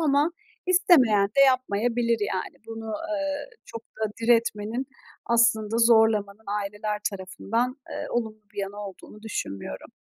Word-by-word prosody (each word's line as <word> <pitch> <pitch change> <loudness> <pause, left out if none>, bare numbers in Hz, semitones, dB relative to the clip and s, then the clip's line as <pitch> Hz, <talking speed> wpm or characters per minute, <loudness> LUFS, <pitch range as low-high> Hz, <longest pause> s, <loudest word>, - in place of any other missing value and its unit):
ama 295 +1 +3 0.3
istemeyen 325 - +5
de 245 +7 +1
yapmayabilir, 240 -2 +1 0.2
yani. 185 - -4
Bunu, 225 0 -7 0.2
eee, 290 +6 -2 0.2
çok 230 - -8
da 220 -2 -5
diretmenin 230 +1 +1 0.4
aslında 230 -2 +3
zorlamanın 220 -3 +4 0.2
aileler 210 +1 -3
tarafından, 215 +6 -2 0.2
eee, - - -4
olumlu 220 -2 -2
bir - - -9
yanı 195 +1 -3
olduğunu 210 +2 -12
düşünmüyorum. 100 - -5
225 Hz, 120 wpm, -26 LUFS, 210-245 Hz, 0.4 s, istemeyen